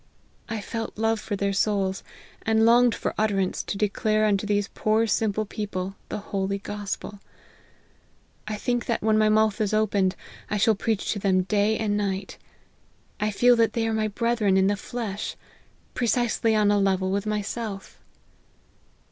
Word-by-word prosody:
I 225 -2 -3
felt 225 +2 -5
love 225 0 +1
for 210 0 -4
their 200 0 -1
souls, 195 -1 0 0.4
and 220 0 +3
longed 240 0 +5
for - - -3
utterance 200 -3 +1
to 200 - -5
de 210 - +2
clare 215 +1 +1
unto 205 -1 +1
these 205 -1 +1
poor 215 +1 +2
simple 215 -1 0
people, 195 -2 -4
the - - -3
holy 200 -1 -2
gos 205 0 -4
pel. 205 - -10 1.3
I 215 - -2
think 240 +2 -2
that 235 - -1
when 215 0 +3
my 215 0 +4
mouth 215 0 +2
is 215 0 +1
opened, 200 -3 +1 0.3
T 210 - 0
shall 220 +2 +4
preach 215 0 -1
to 205 - -4
them 190 -2 +2
day 210 +2 +1
and 210 -2 0
night. 195 -1 -3 0.8
I 210 - +1
feel 245 +4 +4
that 225 -2 +3
they 225 -1 0
are 225 - 0
my 215 0 +1
brethren 215 -2 +1
in 190 - +4
the 205 +1 +2
flesh; 210 -1 -5 0.6
precisely 235 -2 +1
on 210 -1 +3
a 205 - +3
level 190 -1 +1
with 200 +2 -1
myself." 210 -1 -4
210 Hz, 170 wpm, -25 LUFS, 200-220 Hz, 1.3 s, longed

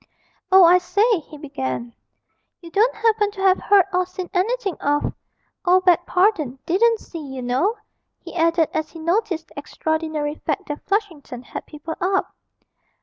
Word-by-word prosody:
'Oh, 380 0 +8
I 350 +1 +7
say,' 415 +3 +2
he 305 0 -13
began, 235 - -5 0.7
'you 335 -1 -12
don't 440 +6 +2
happen 430 -1 +2
to 390 - -7
have 380 -1 +4
heard 400 -3 +4
or 365 0 +1
seen 365 -1 -7
anything 410 +2 0
of 290 +1 0 0.5
oh, 365 0 +5
beg 355 -1 +3
pardon, 360 - +1
didn't 440 +6 +3
see, 330 - -9
you 265 -2 -7
know,' 270 - 0 0.4
he - - -11
added, 330 -1 +2
as 315 0 -2
he - - -12
noticed 340 0 -1
the - - -8
extraordinary 315 0 -2
fact 390 +5 -4
that 295 - -5
Flushington 335 - -3
had - - -8
people 305 +2 -7
up. 385 +2 0
350 Hz, 160 wpm, -22 LUFS, 305-395 Hz, 0.7 s, Oh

